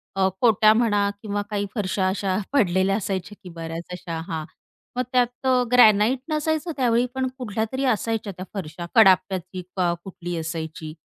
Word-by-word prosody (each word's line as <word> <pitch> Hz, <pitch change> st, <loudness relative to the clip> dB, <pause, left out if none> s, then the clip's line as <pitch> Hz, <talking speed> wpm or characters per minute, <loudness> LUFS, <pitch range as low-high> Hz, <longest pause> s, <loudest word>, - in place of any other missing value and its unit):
अ, 190 Hz, 0 st, +3 dB
कोटया 215 Hz, -2 st, +5 dB
म्हणा 205 Hz, -3 st, +2 dB
किंवा 205 Hz, -1 st, -2 dB
काही 205 Hz, -1 st, -1 dB
फरशा 190 Hz, -2 st, 0 dB
अशा 190 Hz, 0 st, -1 dB, 0.2 s
पडलेल्या 190 Hz, -5 st, +3 dB
असायच्या 190 Hz, -2 st, -4 dB
की 180 Hz, -, -9 dB
बऱ्याच 165 Hz, 0 st, -6 dB
अशा. 170 Hz, -2 st, -5 dB
हां. 160 Hz, -3 st, -4 dB, 0.5 s
मग 250 Hz, -, +2 dB
त्यात 245 Hz, +1 st, +1 dB
अ, 255 Hz, -1 st, +4 dB
ग्रॅनाईट 225 Hz, +1 st, +6 dB
नसायचं 315 Hz, +2 st, -1 dB
त्यावेळी, 240 Hz, -1 st, +3 dB
पण 260 Hz, 0 st, 0 dB
कुठल्यातरी 225 Hz, +2 st, -3 dB
असायच्या 220 Hz, -1 st, -2 dB
त्या 185 Hz, -, -6 dB
फरशा. 175 Hz, -3 st, -6 dB
कडाप्याची 185 Hz, -3 st, +4 dB, 0.2 s
का 175 Hz, -2 st, +2 dB
कुठली 175 Hz, -2 st, -6 dB
असायची, 160 Hz, -1 st, -5 dB
200 Hz, 150 wpm, -24 LUFS, 180-235 Hz, 0.5 s, ग्रॅनाईट